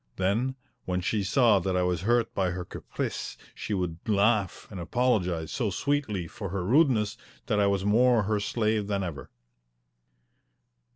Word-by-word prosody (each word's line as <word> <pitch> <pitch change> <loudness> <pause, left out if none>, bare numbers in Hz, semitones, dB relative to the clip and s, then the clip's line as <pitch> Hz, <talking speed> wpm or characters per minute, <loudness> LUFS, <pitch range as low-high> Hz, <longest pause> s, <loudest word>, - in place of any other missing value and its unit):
Then, 110 +8 0 0.3
when 90 0 -1
she 100 +3 -1
saw 110 0 +4
that 95 0 -1
I 90 - +2
was 90 -2 0
hurt 115 +3 +1
by 95 -2 +1
her 90 0 -4
caprice, - - -5 0.2
she 105 - -3
would 90 -3 -2
laugh 105 -2 +2
and 95 - -7
apologize 90 -5 0
so 120 -6 -1
sweetly 110 -3 -1
for 100 +2 -6
her 90 -1 -3
rudeness 115 - +3 0.3
that 105 -4 +1
I 100 - +4
was 100 -1 0
more 120 +2 +4
her 105 +1 0
slave 105 0 0
than 100 -1 -1
ever. 80 -6 -6
100 Hz, 160 wpm, -28 LUFS, 90-115 Hz, 0.3 s, saw